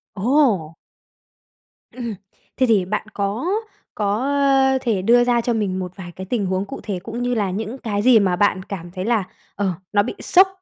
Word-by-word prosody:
Ồ! 210 - +2 1.2
Ừm, 250 - -8
ừm, 220 -3 -3 0.4
thế 260 - +4
thì 210 -6 +3
bạn 210 +2 -3
có 205 +8 -2 0.5
có, 205 -1 0
ơ, 270 -1 +3
thể 220 -7 0
đưa 240 +4 +5
ra 240 -1 +2
cho 240 0 0
mình 195 -4 -1
một 180 -1 -4
vài 175 -3 -8
cái 190 - -7
tình 210 -1 -1
huống 190 +1 -1
cụ - - -7
thể 200 -4 -3
cũng 235 +2 -4
như 245 0 0
là 200 -4 0
những 220 +6 -4
cái 205 -4 -2
gì 240 -1 +6
mà 185 -3 +2
bạn 190 -1 +2
cảm 175 -4 -7
thấy 185 +1 -5
là, 225 -4 +2 0.3
ờ, 200 -1 0 0.2
nó 205 0 +4
bị - - -5
sốc 375 +2 +5
210 Hz, 205 wpm, -21 LUFS, 190-245 Hz, 1.2 s, gì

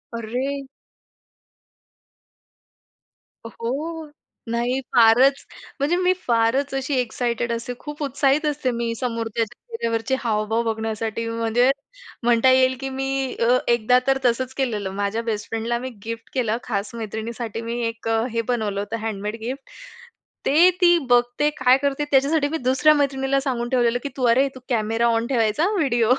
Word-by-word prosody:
अरे! 260 +5 -3 2.8
अ, 230 - -6
हो. 305 +6 -4 0.4
नाही 240 +3 0 0.2
फारच 245 +4 +5 0.3
म्हणजे 290 +5 +1
मी 365 0 +3
फारच 235 +4 +2
अशी 270 +1 -2
एक्साइटेड 235 -1 -1
असते, 235 +2 -4
खूप 295 0 -6
उत्साहित 280 +2 +1
असते 290 -3 0
मी 235 -1 -2
समोरच्याच्या 230 -2 -3
चेहऱ्यावरचे 250 - -1
हावभाव 220 0 0
बघण्यासाठी. 225 0 -3
म्हणजे 230 +2 +2 0.5
म्हणता 240 +2 +4
येईल 260 0 +4
की 270 0 -4
मी 270 0 -2
अ, 240 +2 +4
एकदा 240 +1 +4
तर 270 0 +3
तसंच 255 +2 +1
केलेलं. 220 -8 -1
माझ्या 205 +3 -2
बेस्टफ्रेंडला 225 +1 -2
मी 260 +1 -5 0.2
गिफ्ट 230 0 -6
केला 230 -4 0
खास 210 0 -3
मैत्रिणीसाठी 225 +1 -5
मी 235 +1 -3
एक 230 0 -6 0.2
हे 230 0 0
बनवलं 220 -4 -2
होतं 205 +3 -3
हँडमेड 210 0 -3
गिफ्ट. 260 +4 -6 0.8
ते 335 +6 +6
ती 345 -1 +6
बघते, 245 +4 +3
काय 255 0 +5
करते? 280 +1 -1
त्याच्यासाठी 285 +2 +3
मी 320 - -2
दुसऱ्या 265 +3 +4
मैत्रिणीला 275 -1 +1
सांगून 240 -3 -2
ठेवलेलं 245 -2 +2
की 285 - -3
तू 260 - -3
"अरे! 260 +4 +4
तू - - -9
कॅमेरा 225 0 +1
ऑन 230 +1 0
ठेवायचा 230 +3 +1
हां 405 - +1
व्हिडिओ 240 -6 +3
240 Hz, 145 wpm, -22 LUFS, 230-270 Hz, 2.8 s, ते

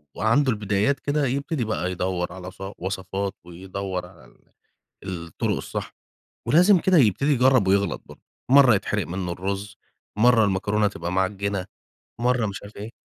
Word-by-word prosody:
وعنده 125 +5 +2
البدايات 105 +5 0
كده 145 0 0
يبتدي 140 +1 -1
بقى 95 -4 -2
يدوّر 90 -1 -2
على 90 0 -8
ص - - -22 0.2
وصَفات 95 +2 -3
ويدوّر 95 +1 -5
على 85 -8 -17
ال - - -25 0.7
الطُّرق 80 - -2
الصح، - - -6 0.5
ولازم 180 +4 +6
كده 185 +1 +2
يبتدي 140 +5 +3
يجرّب 125 -6 +4
ويغلَط 100 -3 +1
برضه، - - -15 0.3
مرَّة 130 -4 +7
يتحرق 105 -1 -1
مِنُّه 90 0 -4
الرز، 100 +3 -4 0.4
مرَّة 115 -1 +5
المكرونة 100 +1 +1
تبقى 85 -2 -5
معجِّنة، 95 0 -1 0.5
مرَّة 125 -2 +2
مش 100 - -6
عارف 100 +1 -12
إيه. 105 +3 -7
100 Hz, 145 wpm, -24 LUFS, 95-125 Hz, 0.7 s, مرَّة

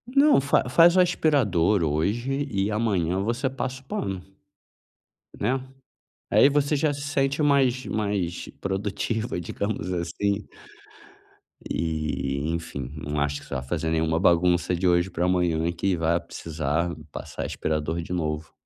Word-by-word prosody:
Não, 285 - +6
fa 135 -2 +1
faz 170 +6 +6
o - - +5
aspirador 105 - +2
hoje 120 - 0
e 100 0 0
amanhã 95 -5 0
você 120 +5 0
passa 130 0 -4
o - - -24
pano, 95 -7 -3 1.2
né, 130 +2 0 0.7
aí 140 - +6
você 145 +1 +1
já 145 0 +1
se 140 - -7
sente 140 0 0
mais 135 -3 +3
mais 100 -5 -2
produtiva, 105 +3 -2
digamos 90 +1 -3
assim. 100 +4 -1 1.2
E, 75 -3 -2
enfim, 70 -6 -5
não 75 0 -3
acho 70 0 -1
que - - -15
você 70 - -5
vai 65 - -3
fazer 80 +3 -2
nenhuma 80 0 +1
bagunça 90 0 +3
de 90 +1 0
hoje 85 +1 +3
para 85 0 -1
amanhã 85 -2 +1
que 90 +2 0
vá 85 +1 +2
precisar 85 0 -2 0.2
passar - - -6
aspirador 80 +2 -2
de 85 - -6
novo. 80 -2 -3
90 Hz, 140 wpm, -25 LUFS, 80-125 Hz, 1.2 s, Não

